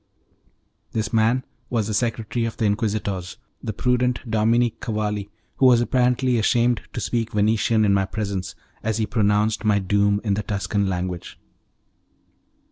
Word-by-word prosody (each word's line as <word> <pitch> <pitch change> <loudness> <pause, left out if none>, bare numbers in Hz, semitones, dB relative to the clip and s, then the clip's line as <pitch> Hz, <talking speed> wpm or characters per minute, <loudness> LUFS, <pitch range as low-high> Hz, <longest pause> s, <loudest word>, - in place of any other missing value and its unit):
This 110 0 -2
man 115 +3 +2 0.2
was 115 -4 0
the 110 - -3
secretary 115 0 -1
of 115 - -4
the 110 - 0
Inquisitors, 105 -3 -1 0.2
the - - -3
prudent 125 +3 +1
Dominic 115 +1 +2
Cavalli, 105 -2 -2 0.3
who 130 - +5
was 125 -2 +6
apparently 125 +1 +2
ashamed 120 +1 +2
to - - -3
speak 115 +3 -2
Venetian 110 +1 +2
in 100 - +3
my 95 -1 +2
presence 100 -3 -4 0.3
as 110 -1 -1
he 110 - +1
pronounced 105 -1 +1
my 105 -2 +3
doom 100 +1 +2
in 105 -3 +1
the 105 - -1
Tuscan 100 -1 -1
language. 90 -1 -4
110 Hz, 145 wpm, -23 LUFS, 100-115 Hz, 0.3 s, was